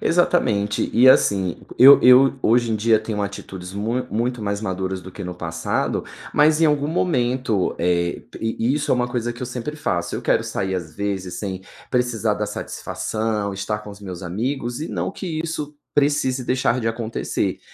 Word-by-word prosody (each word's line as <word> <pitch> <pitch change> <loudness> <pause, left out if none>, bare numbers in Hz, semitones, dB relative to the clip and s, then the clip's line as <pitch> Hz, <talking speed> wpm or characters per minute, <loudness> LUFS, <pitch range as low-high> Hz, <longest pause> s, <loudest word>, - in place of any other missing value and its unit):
Exatamente. 110 - +1
E 125 +3 +6
assim, 95 -8 +3 0.2
eu 135 +3 +10
eu 130 +2 +7
hoje 115 0 +3
em - - +1
dia 110 +1 +3
tenho 110 -1 -3
atitudes 95 -2 -6
mu 115 +5 -2
muito 120 +2 -1
mais 100 0 -2
maduras 95 -2 -3
do 95 0 -11
que 100 - -8
no 90 0 -5
passado, 85 -2 -2 0.3
mas 155 +1 +4
em 165 - +6
algum 145 -1 +1
momento, 125 - 0
eh, 85 0 0
p - - -10
i 115 +3 0
isso 150 0 -2
é - - +5
uma 125 0 0
coisa 120 -1 -2
que 120 - -13
eu 125 - -2
sempre 130 +5 -5
faço, 85 - -2
eu - - -6
quero - - +2
sair 95 -1 -2
às 80 -4 -5
vezes 95 -3 -3
sem 95 0 -5 0.3
precisar 120 -4 +1
dar 105 0 -2
satisfação, 105 0 -3
estar 100 +2 -2
com 105 -1 -10
os 100 +1 -12
meus 90 -3 -7
amigos, 120 +7 -3
e 160 - -4
não - - -3
que 165 -6 -4
isso 150 -2 -5 0.2
precise 140 -3 +1
deixar 130 0 +1
de 115 - 0
acontecer, 115 0 -2
115 Hz, 185 wpm, -22 LUFS, 100-130 Hz, 0.3 s, eu